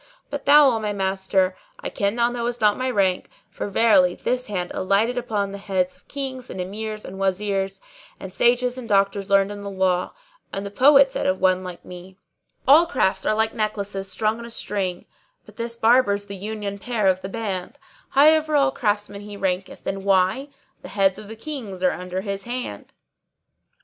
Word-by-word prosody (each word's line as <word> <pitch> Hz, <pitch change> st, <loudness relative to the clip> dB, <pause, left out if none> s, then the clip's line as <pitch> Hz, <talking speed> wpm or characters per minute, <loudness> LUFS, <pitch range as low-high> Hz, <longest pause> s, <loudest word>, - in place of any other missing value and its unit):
But 285 Hz, -1 st, -5 dB
thou, 290 Hz, 0 st, +8 dB
O 225 Hz, -, -1 dB
my 210 Hz, -1 st, -2 dB
master, 190 Hz, -1 st, 0 dB, 0.2 s
I -, -, -5 dB
ken 200 Hz, +1 st, -1 dB
thou 240 Hz, 0 st, +2 dB
knowest 240 Hz, 0 st, -3 dB
not 210 Hz, -1 st, +4 dB
my 255 Hz, 0 st, -2 dB
rank; 195 Hz, -6 st, +1 dB, 0.2 s
for -, -, -5 dB
verily 195 Hz, -4 st, +4 dB
this 250 Hz, 0 st, -2 dB
hand 180 Hz, -4 st, -3 dB
alighteth 200 Hz, +6 st, +1 dB
upon 215 Hz, -5 st, -2 dB
the 200 Hz, -, -7 dB
heads 185 Hz, -2 st, -1 dB
of -, -, -28 dB
Kings 260 Hz, -3 st, -5 dB
and -, -, -7 dB
Emirs 215 Hz, +3 st, -5 dB
and 190 Hz, +1 st, -8 dB
Wazirs, 195 Hz, 0 st, -1 dB, 0.4 s
and 190 Hz, -1 st, -8 dB
sages 245 Hz, +2 st, +2 dB
and 235 Hz, -2 st, -9 dB
doctors 200 Hz, 0 st, +1 dB
learned 195 Hz, 0 st, +3 dB
in 205 Hz, 0 st, -7 dB
the 200 Hz, -, -5 dB
law, 190 Hz, -2 st, 0 dB, 0.4 s
and 195 Hz, +1 st, -4 dB
the 200 Hz, -, -6 dB
poet 275 Hz, +4 st, +6 dB
said -, -, -2 dB
of 185 Hz, 0 st, +1 dB
one 185 Hz, 0 st, +2 dB
like 180 Hz, -1 st, -9 dB
me:— 180 Hz, +1 st, -11 dB, 0.5 s
All 310 Hz, +5 st, +7 dB
crafts 190 Hz, -, 0 dB
are 215 Hz, -, +2 dB
like 220 Hz, 0 st, +1 dB
necklaces 200 Hz, -3 st, -3 dB
strung 215 Hz, +4 st, 0 dB
on 235 Hz, -, -8 dB
a -, -, -10 dB
string, 195 Hz, -5 st, -3 dB, 0.2 s
* -, -, -43 dB
But -, -, -17 dB
this 235 Hz, 0 st, -4 dB
Barber's 220 Hz, -4 st, +3 dB
the 200 Hz, 0 st, -7 dB
union 205 Hz, 0 st, -5 dB
pearl 215 Hz, -3 st, +1 dB
of 185 Hz, 0 st, -5 dB
the 190 Hz, -, -6 dB
band: 200 Hz, +1 st, -4 dB, 0.3 s
High 300 Hz, +4 st, +6 dB
over 310 Hz, -1 st, 0 dB
all 275 Hz, -2 st, +4 dB
craftsmen 205 Hz, -4 st, -2 dB
he 205 Hz, 0 st, -9 dB
ranketh, 190 Hz, -1 st, -3 dB
and 195 Hz, 0 st, -3 dB
why? 195 Hz, +8 st, +2 dB, 0.2 s
* 270 Hz, -, -41 dB
The -, -, -9 dB
heads 195 Hz, -2 st, +1 dB
of 215 Hz, -, -10 dB
the 220 Hz, -, -8 dB
Kings 220 Hz, -8 st, -6 dB
are 185 Hz, -, +4 dB
under 180 Hz, +1 st, -4 dB
his 195 Hz, -1 st, -5 dB
hand!" 240 Hz, -, -5 dB
205 Hz, 200 wpm, -23 LUFS, 190-235 Hz, 0.5 s, thou